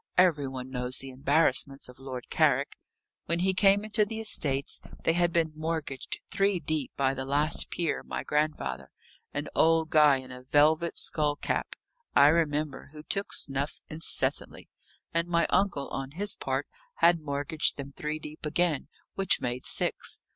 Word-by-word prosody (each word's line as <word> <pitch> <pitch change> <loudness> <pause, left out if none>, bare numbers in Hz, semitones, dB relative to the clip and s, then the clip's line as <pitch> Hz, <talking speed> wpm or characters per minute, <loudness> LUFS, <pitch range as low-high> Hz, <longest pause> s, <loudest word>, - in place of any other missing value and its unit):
"Every 165 -6 +4
one 130 -1 -7
knows 125 0 -1
the 135 0 -5
embarrassments 140 0 +2
of 125 +1 -14
Lord 130 -2 -7
Carrick. 140 -3 +2 0.5
When 170 +1 +1
he 190 +1 +2
came 200 +2 +4
into 215 0 +2
the 220 +2 -4
estates, 145 -10 0 0.2
they 165 - +3
had 175 0 +2
been 165 -2 +1
mortgaged 155 -4 -3
three 195 -2 +2
deep 155 -3 -2
by 135 -1 +2
the 130 0 -3
last 145 +4 0
peer, 170 -3 -1
my - - -5
grandfather 70 - -1 0.4
an - - -3
old 160 0 +3
guy 150 -3 +6
in 130 0 -9
a 125 0 -9
velvet 155 +5 +2
skull 150 -2 0
cap, - - -2 0.4
I 140 +1 +8
remember, 150 -4 0
who 150 0 -10
took 200 +5 -3
snuff 140 +1 -1
incessantly 155 +2 -1 0.4
and 170 +1 +1
my 170 -1 +2
uncle, 175 -9 +1
on 135 0 -4
his 205 +5 +2
part, - - -2 0.3
had 170 - +4
mortgaged 145 +1 0
them 140 -1 -7
three 150 0 -3
deep 155 0 -10
again, 160 -1 0 0.3
which 195 -1 +3
made 125 0 -3
six. - - 0
150 Hz, 160 wpm, -28 LUFS, 135-170 Hz, 0.5 s, I